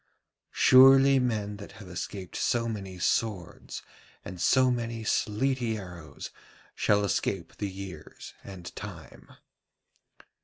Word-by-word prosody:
Surely 135 +1 +7
men 105 -5 -1
that 100 - -11
have 100 - -12
escaped 90 +1 -6
so 120 -2 0
many 95 -4 -5
swords 95 0 -2 0.4
and 90 -1 -7
so 130 +7 +4
many 115 -2 -3
sleety 115 +2 0
arrows 85 -7 -9 0.4
shall 105 0 +2
escape 85 -1 -2
the 100 - -3
years 95 -1 -9
and 95 -3 -10
Time.' 85 -8 -10
105 Hz, 110 wpm, -28 LUFS, 95-120 Hz, 0.4 s, Surely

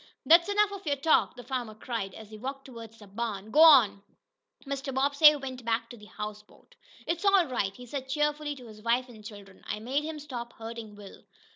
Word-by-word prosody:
"That's 340 +4 +6
enough 410 0 +2
of 395 -4 -9
your 285 - +2
talk!" 295 +3 +2
the 245 - -10
farmer 245 -3 -4
cried 215 -4 -5
as 220 -1 -12
he 215 - -9
walked 270 +3 -6
toward 230 -4 -10
the 225 -2 -15
barn. 210 0 -5
"Go 305 - +5
on!" 265 -11 +7 0.6
Mr. 275 0 -4
Bobbsey 285 +3 +5
went 260 -3 -7
back 230 0 -1
to - - -9
the 210 -1 -14
houseboat. 210 0 -9 0.3
"It's 340 +3 -2
all 395 -3 +5
right," 205 -8 -2
he 250 - -11
said 265 +1 -6
cheerfully 295 +1 -1
to 255 -3 -13
his 215 -2 -13
wife 240 +3 0
and 220 -3 -14
children. 205 -2 -12
"I 210 - -3
made 260 +7 -2
him 315 0 -5
stop 245 -5 -7
hurting 225 -2 -8
Will." 205 -1 -13
250 Hz, 210 wpm, -28 LUFS, 220-290 Hz, 0.6 s, on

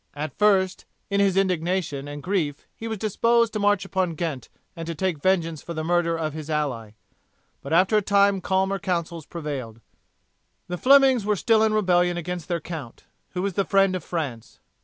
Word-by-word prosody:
At 150 -1 -5
first, 195 -3 +2 0.3
in 200 - +2
his 195 -2 +2
indignation 175 -6 0
and 145 0 -7
grief, 175 -7 -2
he 225 - -7
was 220 -1 -3
disposed 230 +2 +2
to 215 - -2
march 205 -1 +2
upon 185 -3 -1
Ghent 150 -6 -4 0.3
and 165 -1 -7
to 165 - -4
take 180 -4 -2
vengeance 165 -4 +1
for 170 - -7
the 155 - -3
murder 170 0 +1
of 155 -2 -3
his 155 0 -7
ally, 130 -9 -2 0.7
but 140 - -8
after 185 +6 +4
a - - +3
time 200 -1 +3
calmer 190 +2 0
counsels 170 -3 -3
prevailed. 140 -9 -6 0.9
The 180 0 -4
Flemings 270 -3 +5
were 210 +1 +1
still 220 +3 +3
in 220 -1 +2
rebellion 180 -3 +2
against 175 -1 -5
their 175 -2 -1
count, 150 -7 -8 0.3
who 180 - -2
was 200 -1 -1
the 195 - +1
friend 195 0 +3
of 185 - -4
France. 140 -10 -5
180 Hz, 185 wpm, -24 LUFS, 155-195 Hz, 0.9 s, Flemings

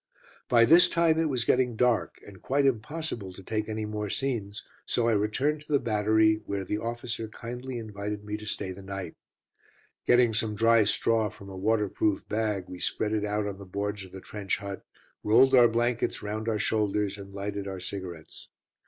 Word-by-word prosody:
By 115 -1 +6
this 165 +7 +7
time 165 -1 +3
it 165 -1 +1
was 125 -4 0
getting 125 -2 +2
dark, 120 0 +1
and 95 -3 -13
quite 140 +1 +1
impossible 120 - -2
to 95 - -12
take 110 +2 -2
any 110 0 -2
more 105 -1 -4
scenes, 110 -5 -2 0.2
so 120 -1 0
I - - +4
returned 130 +9 0
to 150 - -12
the 140 - +4
battery, 110 -1 +2
where 100 -1 -2
the 105 +3 -2
officer 115 0 -4
kindly 125 +3 -7
invited 105 -2 -5
me 105 0 -3
to 105 0 -9
stay 100 -2 -3
the 95 +1 -9
night. 95 -3 -6 0.9
Getting 120 -2 +5
some 110 -1 0
dry 115 0 +4
straw 110 +1 +2
from 100 0 -12
a 95 - -8
waterproof 105 0 0
bag, 105 -3 -1
we 90 - -9
spread 105 - -1
it 105 -1 0
out 105 0 -1
on 100 -1 -5
the - - -8
boards 100 +2 -3
of 95 - -12
the 95 - -9
trench 100 -1 -3
hut, 100 -2 -7 0.4
rolled 125 +5 +5
our 120 -2 +8
blankets 120 0 0
round 110 +2 -3
our 110 - 0
shoulders, 105 -1 0
and 100 0 -10
lighted 100 0 -4
our 95 -1 -5
cigarettes. 90 -4 -7
105 Hz, 190 wpm, -28 LUFS, 100-120 Hz, 0.9 s, our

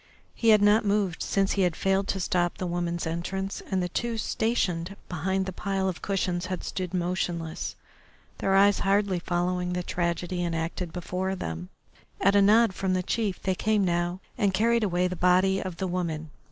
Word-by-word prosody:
He 230 - +1
had 215 -2 +6
not 210 +3 +5
moved 200 -4 0
since 195 -1 +1
he 200 - +1
had 175 -3 +2
failed 195 0 +1
to 195 - -1
stop 175 -1 0
the 185 - -3
woman's 175 -1 -2
entrance, 190 +4 -3
and 190 -2 0
the 180 - -2
two 235 +5 -2
stationed 195 -6 -1
behind 190 +3 -1
the 190 - -4
pile 195 0 -1
of 185 -2 -3
cushions 185 -2 -1
had 185 -1 -4
stood 185 -2 -4
motionless, 175 -2 -2 0.6
their 195 - +2
eyes 200 0 +5
hardly 195 -2 +2
following 180 +1 -1
the 180 0 -2
tragedy 175 +1 -2
enacted 165 +1 -2
before 180 +2 -3
them. 85 - -5 0.5
At 200 +1 +3
a 200 - +6
nod 215 +1 +5
from 185 0 0
the 185 - 0
chief 210 -2 -2
they 190 - +1
came 210 +1 +1
now 175 +1 -1 0.2
and 200 -4 +2
carried 230 +3 +3
away 180 -2 +1
the 180 - -4
body 185 +2 +3
of 185 -3 -5
the 190 - -2
woman. 165 -4 -3
185 Hz, 185 wpm, -27 LUFS, 175-195 Hz, 0.6 s, had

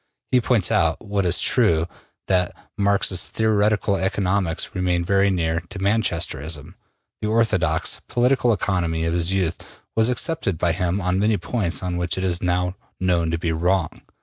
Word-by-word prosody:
He 125 - +4
points 115 -6 +2
out 80 +6 +1
(what 100 -2 0
is 85 - +2
true) 85 -10 +2 0.4
that 90 -2 +1 0.2
Marx's 100 -2 +1
theoretical 105 -2 +1
economics 95 -2 -1
remain 90 -2 0
very 100 +2 +3
near 80 -3 0
to - - -8
Manchesterism: 85 -6 -1 0.5
the 105 - -1
orthodox 95 -8 +1
political 125 0 +2
economy 85 -6 0
of 80 - 0
his 85 +1 +1
youth 90 -3 0 0.4
was 110 +1 +3
accepted 125 - -1
by 85 +1 +1
him 90 +2 -1
on 90 0 0
many 105 +1 +2
points 95 -1 -2
on 90 -1 -2
which 90 +1 -1
it 95 - -2
is 90 -2 -1
now 90 0 0 0.3
known 85 -3 +1
to 85 - 0
be 85 0 -1
wrong. 90 +1 0
90 Hz, 160 wpm, -22 LUFS, 85-100 Hz, 0.5 s, He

